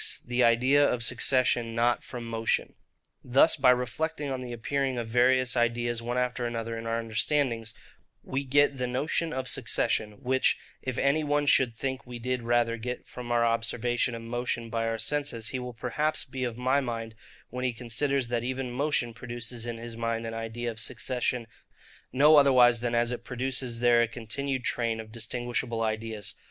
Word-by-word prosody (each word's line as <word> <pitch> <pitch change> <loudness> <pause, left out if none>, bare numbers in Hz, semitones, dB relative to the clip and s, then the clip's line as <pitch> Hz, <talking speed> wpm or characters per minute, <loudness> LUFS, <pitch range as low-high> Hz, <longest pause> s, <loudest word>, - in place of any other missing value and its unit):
The 125 +1 +1
Idea 125 +5 +5
of 125 -4 +1
Succession 120 -1 +1
not 120 +1 +2
from 125 -2 -7
Motion. 115 -1 -1 0.5
Thus 130 +6 +4
by 135 -3 +4
reflecting 140 +4 0
on 130 -1 -3
the 125 -1 -6
appearing 130 +2 -1
of 120 - -2
various 125 +2 +3
ideas 120 0 0
one 120 +2 -3
after 125 0 -1
another 115 -1 -4
in 115 0 -6
our 115 0 0
understandings, 115 0 0 0.5
we 135 +1 -2
get 140 0 +3
the 125 - 0
notion 145 +6 -1
of 130 -3 -3
succession; 105 -3 0
which, 130 +2 +1 0.2
if 130 -2 -4
any 140 +3 +2
one 145 0 +1
should 130 -4 +4
think 130 +2 -3
we 125 -1 -6
did 125 +1 -2
rather 120 0 +1
get 125 +2 -5
from 125 -1 -7
our 120 0 +3
observation 115 +1 0
of 115 - -7
motion 120 0 -3
by 115 0 0
our 115 0 -1
senses, 115 -1 -1
he 130 - -3
will 125 -1 -6
perhaps 140 +7 -1
be 130 -1 -4
of 120 -2 -4
my 130 +3 +2
mind 115 -3 -4 0.4
when 125 +1 -4
he 130 - +1
considers, 125 +3 -1
that 120 -1 -1
even 130 0 -3
motion 130 -2 0
produces 120 0 -4
in 120 -1 -4
his 115 0 -7
mind 115 0 -2
an 115 - -4
idea 115 +1 -4
of 110 - -10
succession 125 +1 -1 0.7
no 150 +4 +6
otherwise 125 -4 +6
than 120 0 -1
as 120 +1 +2
it 125 - -4
produces 125 -1 -2
there 120 -1 +5
a 120 - +2
continued 130 +3 -3
train 115 -2 0
of 110 -1 -8
distinguishable 120 0 -2
ideas. 110 -1 -3
120 Hz, 180 wpm, -28 LUFS, 115-130 Hz, 0.7 s, no